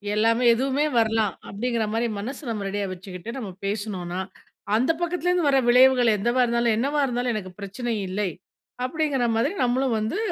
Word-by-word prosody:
எல்லாமே 230 +3 +2
எதுவுமே 270 +4 +1
வரலாம், 220 -3 +2 0.2
அப்பிடிங்கிறமாரி 225 +1 -1
மனச 240 +7 -5
நம்ம 215 -3 -3
ரெடியா 205 +1 -2
வச்சுக்கிட்டு, 185 +3 -8
நம்ம 215 -7 -5 0.2
பேசினோனா, 195 -4 -3 0.6
அந்த 255 +8 +3
பக்கத்துலேருந்து 355 -1 +1
வர 270 - +4
விளைவுகள் 250 -2 +6
என்னவா 240 +5 +1
இருந்தாலும் 235 -1 +1
என்னவா 285 +5 0
இருந்தாலும் 245 -1 -1
எனக்கு 185 -3 -5
பிரச்சனை 225 +4 -4
இல்லை, 190 +1 -1 0.5
அப்பிடிங்கிற 280 -2 0
மாதிரி 255 - +1
நம்மளும் 250 -1 +1
வந்து 220 - -2
235 Hz, 145 wpm, -24 LUFS, 210-260 Hz, 0.6 s, விளைவுகள்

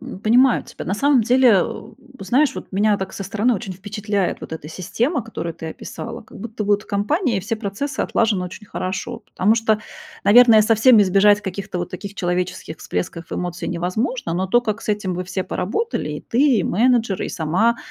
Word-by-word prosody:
М, - - -8
понимаю 245 +4 +4
тебя. - - -9
На 190 - -1
самом 275 +2 +3
деле, 250 +1 +5
а, 190 -3 +4
у - - -9 0.2
по - - -8
знаешь, 265 +7 +2
вот, - - -8
меня, 205 +1 +2
так, 190 -1 -5
со 195 - -6
стороны, 220 +5 +1
очень 190 -1 -5
впечатляет 205 0 -3
вот - - -9
эта 155 -2 -7
система, 235 - -1
которую 170 -7 -5
ты 160 - -8
описала. 230 +8 -7
Как - - -14
будто 220 0 -5
вот 205 0 +2
в - - -21
компании 235 - 0
и - - -1
все 215 +4 -3
процессы 220 +8 -4
отлажены 210 -5 +1
очень 185 +4 -9
хорошо. 200 +6 -4
Потому 210 0 +1
что, 220 -1 +1 0.4
наверное, 225 0 +7
совсем 225 +1 +5
избежать 200 +2 +4
каких-то 195 -1 -5
вот 175 - -4
таких 195 +2 -7
человеческих 180 -3 -3
всплесков 165 - -5
эмоций 175 -1 -4
невозможно, 180 +3 -2
но 190 +2 -1
то, 240 +6 +3
как 225 -1 -3
с - - -10
этим 205 -3 -1
вы 180 +1 -4
все 185 +1 -3
поработали: 450 - -2
и - - -5
ты, 255 -1 +2
и - - +1
менеджер, 230 -1 +2
и - - -3
сама 185 +9 +1
205 Hz, 200 wpm, -21 LUFS, 185-235 Hz, 0.4 s, наверное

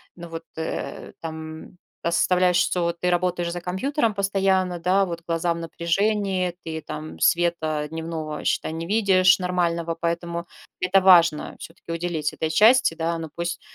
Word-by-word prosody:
ну 170 -1 -9
вот, 165 0 -7
э, 160 - -5
там 160 +2 -8 0.3
оставляешь, 180 +1 +3
что 180 0 +1
вот 170 0 -2
ты 180 - 0
работаешь 175 -1 0
за 175 0 -5
компьютером 225 - -1
постоянно, 195 -2 +1
да, 185 +3 +2
вот 170 -1 -5
глаза 165 0 0
в - - -6
напряжении, 185 +2 0
ты 160 -1 -5
там 155 +1 -7
света 160 -3 +1
дневного, 160 -1 -5
считай, 160 - 0
не 165 +1 -4
видишь 195 -2 +4
нормального. 170 -2 -1
Поэтому 170 0 -3 0.3
это 185 +1 +4
важно 170 -4 +5
все-таки 165 0 -10
уделить 165 -3 -2
этой 160 - -2
части, 220 +2 +5
да. 165 +1 -2
Но 160 -1 -6
пусть 170 0 -4
170 Hz, 155 wpm, -24 LUFS, 165-185 Hz, 0.3 s, важно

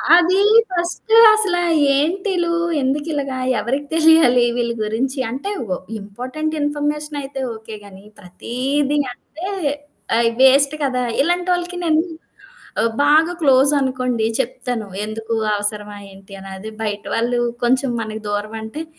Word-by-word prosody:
అది 355 +2 +4 0.3
ఫస్ట్ 345 +5 -3 0.2
అసల 425 -4 +1 0.4
ఏంటిలు? 345 +4 0 0.3
ఎందుకిలాగ? 285 +1 -1 0.3
ఎవరికి 270 +6 -2
తెలియాలి 320 -7 +5
వీళ్ళ 235 -1 0
గురించి? 255 +6 -2
అంటే, 275 - -4 0.2
వ 180 - -1 0.2
ఇంపార్టెంట్ 255 +10 -5
ఇన్ఫర్మేషన్ 295 0 -2
అయితే 270 0 -7
ఓకే 220 0 -9
గానీ, 195 0 -14 0.2
ప్రతీది 265 +10 -2 0.2
అంటే 325 +8 -9 0.7
ఆహ్, 230 0 +3
వేస్ట్ 275 +2 +5
కదా! 255 -2 0 0.2
ఇలాంటోళ్ళకి 355 +2 0
నేను 320 -1 +3 0.8
ఆహ్, 230 - +1
బాగా 315 +4 +4
క్లోజ్ 275 -1 +4
అనుకోండి 255 -4 -1
చెప్తాను. 245 -3 -3 0.2
ఎందుకు? 225 +1 -4 0.2
అవసరమా 210 0 -4
ఏంటి? 195 +1 -15
అని. 195 - -10
అది 220 +2 -8
బయట 205 -1 -3
వాళ్ళు 240 +1 0 0.3
కొంచెం 260 +1 +2
మనకి 220 0 -6
దూరం 205 +2 -3
అంటే, 255 +9 -6
265 Hz, 125 wpm, -19 LUFS, 225-310 Hz, 0.8 s, తెలియాలి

